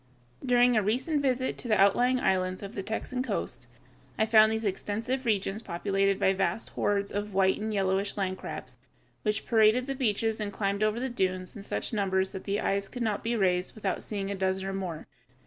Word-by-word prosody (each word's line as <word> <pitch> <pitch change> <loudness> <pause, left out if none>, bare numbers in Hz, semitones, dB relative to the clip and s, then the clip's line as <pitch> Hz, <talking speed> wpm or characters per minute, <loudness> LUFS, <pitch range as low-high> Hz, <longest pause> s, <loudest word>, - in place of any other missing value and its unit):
During 245 -1 +4
a 215 - +4
recent 260 - 0
visit 260 -1 0
to - - -6
the 215 -3 +2
outlying 245 +6 +4
islands 185 -2 0
of 200 +2 -7
the 200 - -3
Texan 225 +5 -3
coast, 125 - -3 0.5
I 220 - +3
found 220 -1 +6
these 220 0 -2
extensive 225 +6 -2
regions 205 -1 0
populated 195 +1 0
by 190 - +3
vast 195 +4 -1
hordes 200 -1 0
of 205 -1 -4
white 190 0 +3
or 215 +1 -3
yellowish 195 0 0
land 185 -2 -1
crabs, - - -7 0.4
which 210 0 -1
paraded 225 +2 +4
the 275 - -2
beaches 225 -4 0
and 210 -1 -2
climbed 200 0 -1
over 215 +2 +1
the 260 - -1
dunes 185 -6 -2
in 205 - -7
such 205 - -3
numbers 190 -2 +1
that 190 - -7
the 200 +1 -1
eyes 200 0 0
could 245 +2 -5
not 215 -3 -1
be 235 +1 0
raised 185 -3 +1
without 205 -3 -2
seeing 200 -2 -4
a - - -2
dozen 190 0 -1
or 195 - -3
more. 180 -5 -4
205 Hz, 200 wpm, -28 LUFS, 195-225 Hz, 0.5 s, found